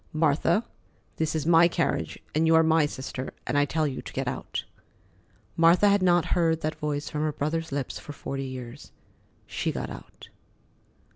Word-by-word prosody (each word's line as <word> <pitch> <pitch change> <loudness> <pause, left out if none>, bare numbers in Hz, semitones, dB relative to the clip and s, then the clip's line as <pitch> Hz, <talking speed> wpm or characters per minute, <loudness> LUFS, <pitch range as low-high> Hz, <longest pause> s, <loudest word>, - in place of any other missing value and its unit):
"Martha, 160 +7 +2 0.5
this 160 0 -1
is 155 -2 -1
my 170 0 +6
carriage, 170 - -1 0.2
and 160 +2 +2
you 160 - +5
are 160 - +6
my 160 -1 +4
sister, 130 -2 -6
and - - -2
I 145 0 +4
tell 155 +2 0
you 135 -3 -3
to - - -10
get - - -2
out." - - -4 0.9
Martha 170 +5 +5
had 200 0 +3
not 175 -2 +4
heard 165 -2 +2
that 155 +1 -1
voice 150 -1 -3
from 150 - -2
her 155 0 +1
brother's 160 +2 -2
lips 140 -2 -3
for - - -9
forty 135 -1 -5
years. 130 0 -8 0.5
She - - -2
got - - -5
out. - - -12
155 Hz, 175 wpm, -27 LUFS, 145-165 Hz, 0.9 s, my